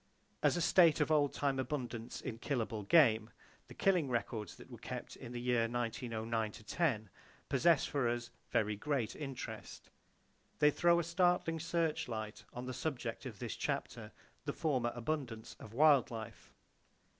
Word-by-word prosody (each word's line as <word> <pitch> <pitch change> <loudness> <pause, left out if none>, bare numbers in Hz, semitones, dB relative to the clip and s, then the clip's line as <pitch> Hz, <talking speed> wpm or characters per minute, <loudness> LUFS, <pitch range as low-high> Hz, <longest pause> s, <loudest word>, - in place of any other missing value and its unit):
As - - +3
a - - 0
state 170 -3 +6
of 150 +1 +2
oldtime 145 -2 +2
abundance 125 -4 -4
in 115 - -5
killable 115 -6 -2
game, 115 -9 +5 0.4
the - - -12
killing 180 -8 +2
records 115 -5 -2
that - - -14
were - - -9
kept - - -6
in 120 - -9
the 120 - -4
year 120 -2 +2
1909 115 -2 -2
10 110 - -1 0.4
possess 155 +3 +4
for 135 -5 0
us 120 0 -3 0.2
very 105 -1 +1
great 125 0 -1
interest. 135 -4 -7 0.7
They 150 0 +5
throw 170 +3 +4
a - - 0
startling 170 -1 +2
searchlight 150 -10 -2
on 125 +1 -6
the 130 - -4
subject 125 -2 -3
of 110 -5 -8
this - - -4
chapter,—the - - -5
former 130 -7 0
abundance 120 -3 -3
of 110 - -10
wild 145 +1 +5
life. 115 -1 -8
125 Hz, 145 wpm, -35 LUFS, 115-155 Hz, 0.7 s, state